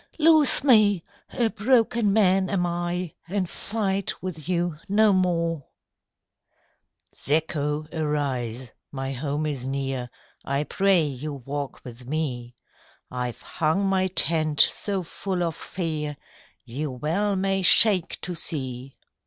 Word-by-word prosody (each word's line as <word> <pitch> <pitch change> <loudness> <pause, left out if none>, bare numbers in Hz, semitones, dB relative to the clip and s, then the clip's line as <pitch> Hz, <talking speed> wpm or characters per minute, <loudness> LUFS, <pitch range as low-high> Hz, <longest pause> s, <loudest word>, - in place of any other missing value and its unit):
"Loose 310 -4 +6
me! 210 - +4 0.3
a 235 -2 0
broken 225 -1 +2
man 195 -2 +3
am 180 -3 0
I, 175 0 -3
And 190 0 -1
fight 200 0 -3
with 170 -3 -6
you 175 -3 -1
no 210 +1 +4
more.'' 170 -5 0 1.5
"Zacho, 150 0 0
arise, 130 -6 -2 0.2
my 135 -1 -4
home 145 +3 -2
is 140 -5 -3
near; 135 -2 -3 0.3
I 140 +2 -1
pray 190 +1 +2
you 145 +1 -5
walk 140 +1 -6
with 125 0 -11
me: 125 -5 -3 0.6
I've 125 -1 -4
hung 165 +5 0
my 190 -1 +2
tent 160 -4 0
so 195 -3 +1
full 180 +1 -3
of 165 -2 -2
fear 155 -6 -4 0.5
You 140 +5 -4
well 165 +11 -1
may 195 0 0
shake 190 -1 +5
to 180 - -3
see. 130 -5 -3
165 Hz, 120 wpm, -25 LUFS, 140-195 Hz, 1.5 s, Loose